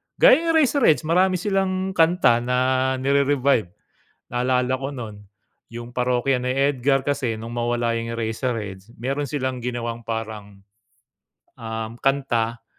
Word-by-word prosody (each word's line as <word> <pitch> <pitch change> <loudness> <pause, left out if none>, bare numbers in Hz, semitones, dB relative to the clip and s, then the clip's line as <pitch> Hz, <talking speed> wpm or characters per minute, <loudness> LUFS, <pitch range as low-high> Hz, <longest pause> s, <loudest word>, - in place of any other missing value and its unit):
Gaya - - +6
yung 335 0 -2
Eraserheads 275 - +3
marami 180 +4 +3
silang 190 0 -1
kanta 165 -8 +3
na 125 +1 -1 0.4
nire-revive. 140 -3 +2 0.7
Naalala 125 +1 +1
ko 135 - -3
no'n, 115 -7 -7 0.5
yung 120 +1 -9
Parokya 125 +1 +1
ni 125 - -3
Edgar 135 -1 +1
kasi 135 -5 -1
nung 115 +2 -8
mawala 120 0 0
yung 115 0 -5
Eraserheads, 110 -4 -3
meron 135 +4 -3
silang 130 -3 -3
ginawang 120 -1 -4
parang, 110 -3 -6 1.0
um, 110 +1 -5
kanta 120 -4 0
125 Hz, 120 wpm, -23 LUFS, 115-140 Hz, 1.0 s, Gaya